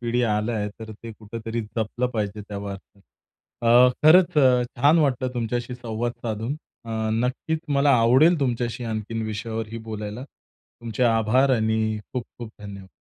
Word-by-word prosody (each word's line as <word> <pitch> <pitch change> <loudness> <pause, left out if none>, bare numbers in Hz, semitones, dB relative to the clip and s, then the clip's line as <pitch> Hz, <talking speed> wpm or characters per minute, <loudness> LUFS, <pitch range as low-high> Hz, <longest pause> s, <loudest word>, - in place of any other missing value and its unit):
पिढी 120 +1 0
आलं 110 0 0
आहे. 105 -2 -1
तर 110 0 -7
ते 115 +1 -10
कुठेतरी 115 +1 -5
जपलं 110 +3 -2
पाहिजे 105 -1 -2
त्या 100 -1 -5
बाबतीत. 100 0 -9 0.6
अ, 120 +2 +7
खरंच 165 +2 +6
अ, 125 -3 +5
छान 145 +6 +5
वाटलं 130 -4 +1
तुमच्याशी 120 +1 -2
संवाद 120 0 -3
साधून 115 +5 -3 0.3
अ, 115 - -8 0.2
नक्कीच 125 +7 -1 0.2
मला 140 +1 +4
आवडेल 130 +9 +5
तुमच्याशी 120 -2 -1
आणखीन 110 0 -3
विषयावरही 110 +1 -4
बोलायला. 105 +4 -5
तुमचे 120 -4 -9
आभार 115 +4 +3
आणि 110 -1 0
खूप-खूप 120 -2 -6
धन्यवाद! 100 -2 -9
115 Hz, 145 wpm, -24 LUFS, 110-125 Hz, 0.6 s, अ